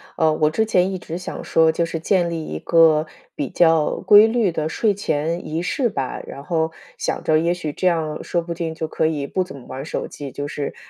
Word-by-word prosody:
呃， 160 -2 +3
我 155 0 +2
之 220 +8 +1
前 190 -3 +2
一 185 - -4
直 165 0 -6
想 180 - -6
说 160 0 +3
就 165 +1 0
是 165 -1 -3
建 175 0 +1
立 165 -2 -4
一 80 - -5
个 160 -2 +4 0.3
比 140 - -3
较 165 -3 +3
规 210 +1 +7
律 225 -4 +1
的 155 -1 -2
睡 210 +5 +1
前 165 -3 -2
仪 160 +2 -2
式 240 +6 0
吧， 135 -10 -4
然 140 - -8
后 160 0 0 0.3
想 - - -2
着 155 0 +3
也 170 +2 +1
许 165 -4 -3
这 185 - 0
样 160 -3 -1
说 170 -1 -1
不 170 0 -4
定 165 -1 -4
就 160 -1 -3
可 160 - 0
以 150 -3 -2
不 185 +6 -1
怎 180 - -10
么 130 - -12
玩 130 - -7
儿 140 - -5
手 - - -4
机， 140 -2 -8
就 145 +2 -5
是， 145 -1 -4
165 Hz, 260 characters per minute, -21 LUFS, 155-175 Hz, 0.3 s, 规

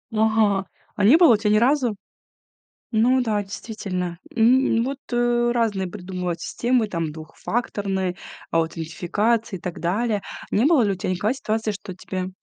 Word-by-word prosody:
Ага, 215 -3 +2 0.3
а 205 - -1
не 240 +10 +7
было 325 -11 +6
тя 210 0 0
ни 210 - +4
разу. 245 -1 +2 1.0
Ну 245 +3 +3
да, 215 -3 0
действительно, 190 -4 -5 0.2
м, 235 0 +4
вот, 270 +1 -3
э, 240 0 +2
разные 220 -5 0
придумывают 180 -2 -4
системы, 240 +2 0
там 165 -5 -2
двухфакторные 190 +3 -3 0.4
аутентификации 175 +7 0
и - - -8
так 180 -1 -6
далее. 205 +4 0 0.3
Не 215 - +3
было 300 -3 +5
ли 205 -3 +2
у - - -1
тебя 185 - -3
никогда 205 +6 0
ситуации, 220 -4 -2
что 195 -2 -8
тебе 185 0 -5
210 Hz, 150 wpm, -23 LUFS, 185-235 Hz, 1.0 s, не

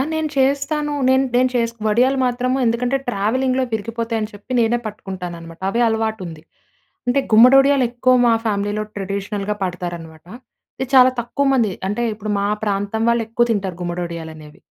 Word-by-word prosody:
నేను 315 -1 -1
చేస్తాను. 280 +2 +1 0.2
నేను, 260 +1 +4
నేను 255 +1 +3
చేస్ 230 -1 +1
వడియాలు 250 +5 +2
మాత్రము 250 +1 0
ఎందుకంటే, 245 +3 +1
ట్రావెలింగ్‌లో 255 +5 0
విరిగిపోతాయి 230 +1 -2
అని 215 +1 -4
చెప్పి, 205 +5 -10
నేనే 235 +1 +2
పట్టుకుంటాననమాట. 180 -5 -8
అవే 235 - -1
అలవాటు 220 -1 -1
ఉంది. 160 -2 -10 0.7
అంటే 265 +3 +3
గుమ్మడొడియాలు 270 +3 +6
ఎక్కువ 255 +1 +2
మా 230 - +5
ఫ్యామిలీలో 205 0 -1
ట్రెడిషనల్‌గా 200 +1 -3
పడతారన్నమాట. 175 -3 -6 0.5
ఇది 265 - -2
చాలా 255 0 +7
తక్కువ 240 +4 -2
మంది 230 -7 +2 0.2
అంటే, 210 +4 -1
ఇప్పుడు 215 0 -5
మా 200 - 0 0.2
ప్రాంతం 205 +2 -1
వాళ్ళు 235 -1 +1
ఎక్కువ 240 +1 +2
తింటారు 195 -5 -2
గుమ్మడొడియాలు 170 -2 -5
అనేవి. 150 -1 -14
225 Hz, 150 wpm, -20 LUFS, 195-255 Hz, 0.7 s, చాలా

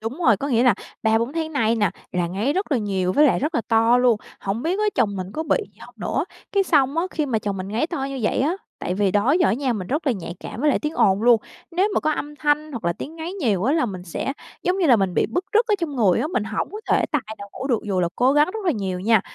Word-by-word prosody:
Đúng 225 +7 -5
rồi, 220 - +6
có 280 +8 -4
nghĩa 240 -2 +3
là 245 -5 +5 0.3
3-4 225 +4 +2
tháng 320 -1 -3
nay 230 -5 +2
nè 205 -4 +2 0.2
là 175 -1 0
ngáy 205 +11 -1
rất 380 -3 -1
là 260 - +3
nhiều 190 -3 -1
với 300 +1 +5
lại - - +3
rất 305 +5 -2
là 235 - +2
to 230 +2 +4
luôn. 245 -3 +4 0.2
Hổng 200 +4 -3
biết 360 +5 0
á 425 - +1
chồng 205 -6 +1
mình 185 +1 -5
có 315 - -3
bị - - +2 0.2
gì - - -28
hông - - -13
nữa? - - -1 0.3
Cái 400 -1 +3
xong 285 -4 +2
á, 335 - +2
khi 305 -2 -1
mà 230 -4 0
chồng 200 -2 -3
mình 185 0 -5
ngáy 220 +9 0
to 320 -6 -3
như 275 0 -4
vậy 215 - +1
á, 295 +6 +2 0.3
tại 180 - -3
vì 200 -1 +2
đó 210 +8 +2
giờ 355 - +5
á - - +3
nha 260 0 0
mình 195 -5 -4
rất 300 - -2
là 260 - +4
nhạy 175 -4 -6
cảm 235 - -7
với 300 - +3
lại - - +2
tiếng 300 +1 -3
ồn 195 +1 +3
luôn, 235 -2 +5 0.3
nếu 370 +4 +2
mà - - +2
có 310 - +1
âm 295 0 -5
thanh 300 +1 0
hoặc 235 -7 -6
là 170 - +2
tiếng 315 - -8
ngáy 330 +2 -5
nhiều 225 - 0
á 275 - +2
là 315 -6 +2
mình 185 -3 -6
sẽ, 185 +9 -3 0.3
giống 365 +2 0
như 350 - +2
là, 250 - +6
mình 190 -3 0
bị - - +2
bứt 360 +2 -2
rứt 450 +2 +4
ở 425 - +3
trong 310 -5 -3
người 205 -7 +3
á, - - 0
mình 310 -10 -1
hổng 220 -1 -2
có 425 +2 -7
thể - - +3
tài 295 -4 0 0.2
nào 200 - -9
ngủ 265 - -5
được 240 -5 +1
dù 190 -3 0
là 170 - +1
cố 255 +2 +4
gắng 295 +4 +4
rất 435 -3 -5
là 345 - +3
nhiều 190 -5 -3
nha. 220 +1 +4
250 Hz, 305 wpm, -22 LUFS, 205-305 Hz, 0.3 s, rồi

